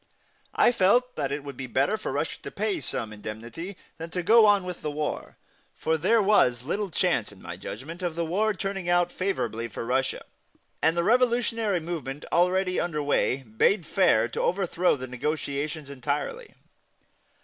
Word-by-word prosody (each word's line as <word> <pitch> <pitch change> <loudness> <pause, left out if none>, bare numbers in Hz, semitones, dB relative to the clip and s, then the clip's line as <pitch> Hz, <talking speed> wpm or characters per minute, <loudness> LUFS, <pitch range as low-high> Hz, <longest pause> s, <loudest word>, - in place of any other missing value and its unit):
I - - +5
felt 245 +4 +3
that 135 - -2
it 145 0 -3
would 140 -2 -7
be 130 0 -6
better 135 - +1
for - - -4
Russia - - -3
to - - -6
pay 380 -6 -2
some 110 -2 -3
indemnity 115 - -7 0.2
than 165 +1 -6
to 180 +1 -3
go 220 +3 +7
on 205 -2 +4
with 180 -1 -6
the 150 - -2
war, 150 0 -4 0.4
for 160 - 0
there 205 +8 +3
was 125 - +3
little 200 +8 -2
chance, 170 - 0
in 100 - -15
my 85 - -7
judgment, 135 - -8
of 175 -3 -2
the 170 0 -1
war 205 +6 +1
turning 195 -2 -3
out 175 0 +3
favorably 115 - -2
for 115 - -6
Russia, 130 +2 0 0.6
and 160 +2 +3
the 170 - +2
revolutionary 230 -4 +2
movement 155 -4 -5
already 185 +1 +2
under 150 -4 -1
way 135 -2 +1
bade 130 - +2
fair 120 - +3
to - - -3
overthrow 180 -1 +1
the 130 -2 -6
negotiations 145 +3 -3
entirely. 145 - -4
170 Hz, 170 wpm, -27 LUFS, 135-195 Hz, 0.6 s, go